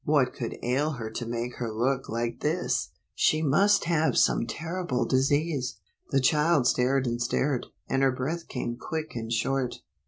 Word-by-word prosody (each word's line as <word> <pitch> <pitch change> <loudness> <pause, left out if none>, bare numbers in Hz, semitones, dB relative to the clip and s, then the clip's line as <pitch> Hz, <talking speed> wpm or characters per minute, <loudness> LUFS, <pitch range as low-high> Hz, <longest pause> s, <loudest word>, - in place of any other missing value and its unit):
What 140 -4 +2
could 120 - -5
ail 140 +6 +1
her 115 -4 -5
to 120 +1 -4
make 120 +1 -3
her 115 -2 -3
look 125 +4 0
like 115 +1 -2
this? 165 +4 0 0.2
She 155 - +2
must 195 +8 +4
have 165 -2 +1
some 115 - +3
terrible 160 -1 -2
disease! 140 0 +1 0.3
The 135 - +3
child 150 +1 +3
stared 130 +2 +2
and 120 0 -2
stared, 130 +2 0 0.2
and 135 - +1
her 135 -1 +4
breath 155 +7 -3
came 120 -2 -4
quick 160 +1 -4
and 115 -1 -5
short. 130 +2 -1
135 Hz, 165 wpm, -27 LUFS, 120-155 Hz, 0.3 s, must